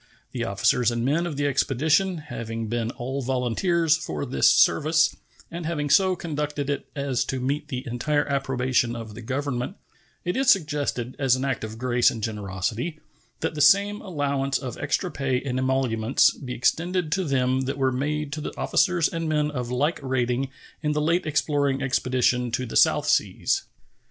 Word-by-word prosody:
The 120 -2 -3
officers 105 +4 +2
and 120 0 -2
men 165 +6 +1
of 150 -5 -5
the 145 - 0
expedition 155 +7 +2
having 115 -7 -5
been 115 0 -1
all 130 +3 -4
volunteers 135 +6 +1
for 155 -2 -4
this 130 - +3
service 160 +1 +4 0.4
and 170 -1 -5
having 145 -4 -2
so 190 -2 +5
conducted 150 -4 -3
it 140 - -4
as 140 -3 0
to 130 - -3
meet 140 +4 -2
the 130 -1 -5
entire 145 +5 0
approbation 130 -3 0
of 115 -2 -7
the 115 - -9
Government, 130 - -3 0.5
it 180 - -1
is 270 0 +2
suggested, 145 - +1
as 135 -3 +3
an 130 +1 -2
act 135 -5 -2
of 110 0 -6
grace 125 0 +3
and 110 -2 -6
generosity, 110 - -3 0.4
that - - -1
the 150 - -3
same 200 +7 +4
allowance 140 -7 -1
of 125 -3 -6
extra 175 +5 -1
pay 135 -3 -1
and 130 -1 -3
emoluments 130 -2 +2
be 125 -2 -7
extended 175 +5 0
to 190 +3 +1
them 130 -3 +1
that 135 - -3
were 135 -1 +2
made 145 +3 -2
to 155 - -4
the - - -6
officers 175 -4 +2
and 165 -1 -3
men 150 -1 +1
of 125 -4 -4
like 145 +7 0
rating 130 0 -1 0.3
in 150 -1 0
the 150 - 0
late 165 +2 +1
exploring 145 -2 +1
expedition 125 -2 +1
to 120 +2 -2
the 115 - -7
South - - +4
Seas. - - +1
135 Hz, 175 wpm, -25 LUFS, 125-155 Hz, 0.5 s, so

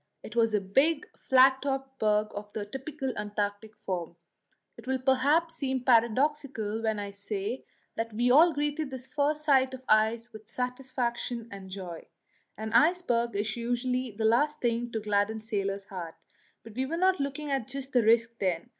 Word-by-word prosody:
It 220 - -9
was 225 -2 +3
a - - +3
big, 270 +11 +1
flat 265 0 +5
topped 270 -1 -3
berg 210 0 +2
of 205 0 -7
the 210 - -3
typical 270 +3 -5
Antarctic 205 +1 -3
form. 175 -3 -3 0.6
It - - -14
will 265 0 +1
perhaps 280 +6 +2
seem 265 -4 -2
paradoxical 235 -2 +2
when 220 -1 0
I 200 -1 -4
say 200 +4 -4 0.3
that 230 0 -2
we 240 +3 +2
all 320 +6 +7
greeted 295 0 -2
this 260 -1 -7
first 295 +2 0
sight 265 -3 +3
of 260 - -12
the 260 - +4
ice 225 +2 +1
with 215 -1 -11
satisfaction 250 -1 -3
and 195 -1 -9
joy; 185 -3 -7 0.5
an 220 +1 -5
iceberg 240 - +3
is 205 0 -1
usually 245 +2 -1
the 220 +1 -3
last 290 +7 +3
thing 240 0 -1
to 225 - -2
gladden 210 +1 0
sailors' 200 -3 -3
hearts, 175 -4 -8 0.4
but 225 - -11
we 260 +3 -2
were 330 +4 -2
not 370 +1 +3
looking 280 +1 -3
at 270 -5 -1
the 265 -1 0
risk 230 +1 +4
just 230 - -40
then. 180 -4 -1
235 Hz, 175 wpm, -29 LUFS, 215-270 Hz, 0.6 s, all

